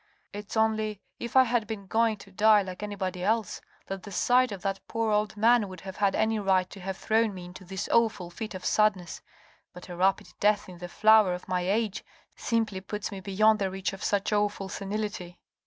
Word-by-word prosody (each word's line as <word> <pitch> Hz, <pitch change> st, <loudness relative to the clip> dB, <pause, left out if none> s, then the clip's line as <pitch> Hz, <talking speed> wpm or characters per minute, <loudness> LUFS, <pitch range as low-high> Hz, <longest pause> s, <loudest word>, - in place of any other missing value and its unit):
" -, -, -43 dB
It's 205 Hz, +2 st, -6 dB
only, 215 Hz, -2 st, +1 dB, 0.2 s
if 235 Hz, +1 st, -6 dB
I 260 Hz, -, +8 dB
had 240 Hz, -3 st, 0 dB
been 215 Hz, -3 st, -6 dB
going 225 Hz, +2 st, +1 dB
to 195 Hz, 0 st, -15 dB
die 210 Hz, +1 st, +5 dB
like 185 Hz, 0 st, -8 dB
anybody 190 Hz, -3 st, -4 dB
else, 220 Hz, +1 st, 0 dB, 0.2 s
that 195 Hz, -1 st, -5 dB
the 200 Hz, -, -10 dB
sight 250 Hz, +5 st, +3 dB
of 195 Hz, -3 st, -7 dB
that 195 Hz, 0 st, -1 dB
poor 225 Hz, -1 st, -1 dB
old 210 Hz, 0 st, 0 dB
man 225 Hz, 0 st, +4 dB
would 185 Hz, -2 st, -10 dB
have 190 Hz, -1 st, -8 dB
had 200 Hz, -1 st, +2 dB
any 220 Hz, 0 st, +1 dB
right 190 Hz, -2 st, +2 dB
to 200 Hz, -, -10 dB
have 190 Hz, 0 st, -5 dB
thrown 220 Hz, -2 st, +1 dB
me 180 Hz, -1 st, -8 dB
into 180 Hz, +2 st, -11 dB
this 190 Hz, +1 st, -5 dB
awful 215 Hz, -6 st, +1 dB
fit 215 Hz, +3 st, -6 dB
of 185 Hz, -, -7 dB
sadness: 205 Hz, -5 st, +1 dB, 0.5 s
but 180 Hz, +1 st, -12 dB
a 175 Hz, -, -6 dB
rapid 190 Hz, +2 st, +1 dB
death 205 Hz, 0 st, +2 dB
in 180 Hz, -2 st, -11 dB
the 175 Hz, 0 st, -7 dB
flower 215 Hz, -2 st, +5 dB
of 180 Hz, -, -10 dB
my 180 Hz, -1 st, 0 dB
age 215 Hz, 0 st, 0 dB, 0.3 s
simply 220 Hz, -5 st, -1 dB
puts 210 Hz, +2 st, -5 dB
me 195 Hz, -, -6 dB
beyond 210 Hz, +3 st, +3 dB
the 195 Hz, -1 st, 0 dB
reach 190 Hz, +1 st, -3 dB
of 195 Hz, -, -8 dB
such 205 Hz, +1 st, 0 dB
awful 205 Hz, -2 st, 0 dB
senility." 195 Hz, -3 st, -4 dB
205 Hz, 215 wpm, -28 LUFS, 190-220 Hz, 0.5 s, I